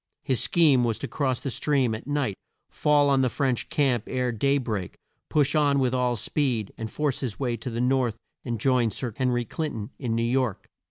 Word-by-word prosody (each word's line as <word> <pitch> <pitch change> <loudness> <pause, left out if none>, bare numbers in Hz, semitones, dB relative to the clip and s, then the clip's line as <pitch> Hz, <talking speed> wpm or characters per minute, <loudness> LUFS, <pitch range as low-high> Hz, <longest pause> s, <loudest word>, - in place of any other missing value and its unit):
His 130 -6 0
scheme 150 -7 +4
was 115 -2 0
to - - -4
cross 130 -4 -1
the 135 - -4
stream 135 -4 +1
at 110 - -6
night, 145 -8 0 0.4
fall 145 -1 +3
on 135 -1 +3
the 130 - +2
French 130 0 -1
camp 130 -6 +1
ere 125 -1 -1
day 140 +5 +2
break, 105 -8 -3 0.3
push 145 -3 +2
on 145 -2 +3
with 130 -2 +1
all 125 -1 +1
speed, 120 -2 -1
and 110 -1 -5
force 145 +2 -1
his 125 -6 -4
way 125 -4 0
to 115 - -5
the 115 0 -4
north 125 -3 +1 0.3
and 120 -2 -3
join 125 -1 +2
Sir 115 +2 -4
Hen 130 -1 +1
ry 120 -1 +1
Clin 155 +6 -3
ton 105 -2 -5
in 120 -4 -1
New 115 - +1
York. 120 -3 0
125 Hz, 215 wpm, -26 LUFS, 115-140 Hz, 0.4 s, scheme